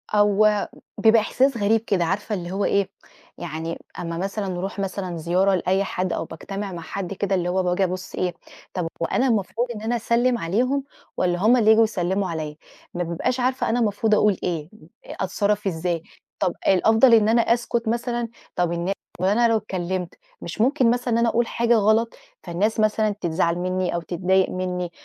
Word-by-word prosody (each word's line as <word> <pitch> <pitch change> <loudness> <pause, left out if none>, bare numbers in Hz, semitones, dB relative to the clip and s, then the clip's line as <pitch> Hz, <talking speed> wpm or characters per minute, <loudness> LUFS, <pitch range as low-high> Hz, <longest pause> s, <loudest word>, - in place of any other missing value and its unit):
هو 210 0 +3 0.3
بيبقى 225 0 +5
إحساس 260 +3 +1
غريب 220 +2 +3
كده، 190 -6 0
عارفة 205 +4 -2
اللي 175 -1 -5
هو 200 +1 -1
إيه، 200 -1 +1 0.5
يعني 165 0 -5 0.2
أمّا 165 -1 -4
مثلًا 195 +2 -3
نروح 190 +2 -4
مثلًا 185 -3 -3
زيارة 185 +4 +2
لأي 190 +2 +1
حد 185 -2 -2
أو - - -2
باجتمع 195 +5 -6
مع 170 - -6
حد 195 +3 -5
كده 195 0 -1
اللي 180 -1 -1
هو 185 +1 +1
باجي 180 +2 +1
أبُص 185 0 -3
إيه، 180 -1 -1 0.4
طَب 180 -3 -2
هو - - +2
أنا 265 - +1
المفروض 230 +2 0
إن 210 - -7
أنا 235 +2 -1
أسلّم 240 +2 +1
عليهم، 250 +11 0 0.3
والّا 175 -1 +1
هُم 230 +5 +5
اللي 220 -2 +4
ييجوا 220 +1 +7
يسلموا 190 -2 -1
عليّا، 155 -2 -4 0.4
ما 175 - -2
بابقاش 175 +10 -2
عارفة 255 +1 0
أنا 240 +2 +1
المفروض 215 0 +2
أقول 210 -2 +3
إيه، 165 -3 -2 0.4
أتصرّف 200 +2 -1
إزاي، 170 -1 -2 0.4
طَب 180 - +1
الأفضل 220 +6 +5
إن 220 -1 +5
أنا 235 +1 +4
أسكت 235 0 0
مثلًا، 235 0 -1 0.3
طَب 175 -1 +1
النا 175 +3 -1 0.3
وأنا 210 +6 +3
لو 225 -1 +3
اتكلّمت، 185 -3 -3 0.3
مش - - -4
ممكن 255 0 +3
مثلًا 245 -1 -1
إن - - +3
أنا 235 0 +3
أقول 235 +1 +1
حاجة 235 0 +2
غلط، 220 +2 +3 0.3
فالناس 195 +6 -1
مثلًا 215 0 +2
تزعل 170 0 +1
مِنّي 185 0 -1
أو 170 - -1
تتضايق 185 +3 +1
مِنّي، 180 -1 -3
195 Hz, 180 wpm, -23 LUFS, 180-225 Hz, 0.5 s, ييجوا